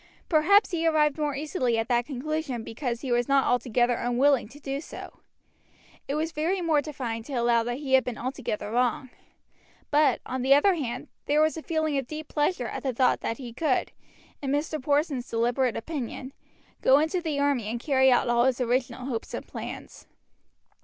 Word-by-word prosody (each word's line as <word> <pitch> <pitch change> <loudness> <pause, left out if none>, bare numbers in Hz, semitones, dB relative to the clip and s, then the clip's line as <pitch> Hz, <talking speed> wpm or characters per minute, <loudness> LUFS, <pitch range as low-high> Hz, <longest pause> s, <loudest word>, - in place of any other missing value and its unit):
Perhaps 380 +7 +4
he 330 -2 0
arrived 305 -2 +2
more 295 -2 -1
easily 270 -5 -1
at 225 0 -1
that 240 -1 +1
conclusion 285 -2 -3
because 235 0 -4
he 260 - -4
was 240 0 +2
not 275 -1 +3
altogether 245 0 +2
unwilling 245 +2 +2
to 285 +6 -14
do 275 -1 -4
so. - - -10 0.9
It 280 - -2
was 320 +2 -1
very 330 +5 -1
mortifying 285 -8 -1
to 280 - -8
allow 235 -1 +3
that 240 +1 -3
he 275 -2 -4
had 265 -1 +6
been 245 -3 -5
altogether 235 -5 -4
wrong; 250 +1 0 0.8
but, 290 -3 +4
on 255 0 -3
the 265 +2 +5
other 380 +7 +4
hand, 275 -9 -4 0.2
there 295 +1 +3
was 310 0 +3
a 320 - -5
feeling 315 -3 0
of 265 - -6
deep 310 +1 -6
pleasure 295 -3 0
at - - -5
the 265 -2 -2
thought 255 0 +3
that 230 - -3
he 245 -4 -8
could, 275 0 0 0.5
in 275 - -3
Mr. 300 +1 -1
Porson's 285 -2 0
deliberate 240 +2 +1
opinion, 265 -1 -5 0.5
go 265 - +6
into 320 +4 +1
the 310 -4 -2
army 280 -5 +1
and 230 +3 -3
carry 265 0 +3
out 245 +1 +3
all 240 0 +3
his 260 -1 +1
original 250 +1 -1
hopes 240 -4 -4
and - - -7
plans. - - -8
270 Hz, 185 wpm, -27 LUFS, 245-300 Hz, 0.9 s, had